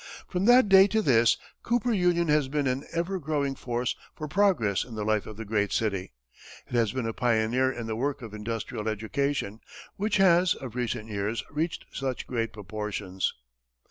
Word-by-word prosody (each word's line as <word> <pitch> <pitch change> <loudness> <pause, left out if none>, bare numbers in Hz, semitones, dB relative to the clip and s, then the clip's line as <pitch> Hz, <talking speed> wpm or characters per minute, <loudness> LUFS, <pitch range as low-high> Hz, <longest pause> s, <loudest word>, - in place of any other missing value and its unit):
From 180 +1 -1
that 245 0 +7
day 195 0 +8
to 220 +2 +1
this, 115 - +4 0.2
Cooper 240 0 +1
Union 175 -3 +2
has 150 -2 +3
been 145 +1 -1
an 130 +2 -1
ever 175 +3 -1
growing 145 -3 -1
force 120 -2 -2 0.2
for 155 - -5
progress 155 - +2
in 120 - -10
the 105 - -3
life 110 -1 +1
of 110 - -9
the 115 - -6
great 105 -1 0
city; 100 - -1 0.5
it - - -14
has 115 -3 +2
been 130 -1 -3
a 115 - -2
pioneer 120 +2 +2
in 120 -3 -5
the 110 -1 -3
work 135 +2 -2
of 110 -2 -8
industrial 105 0 -4
education, 110 +1 -2 0.4
which 210 +1 +1
has, 180 -2 +5
of 130 -5 -8
recent 115 -3 -3
years, 105 +2 -2
reached 160 +3 -2
such 130 -2 -3
great 115 -2 -2
proportions. 105 -2 -3
125 Hz, 180 wpm, -27 LUFS, 110-165 Hz, 0.5 s, day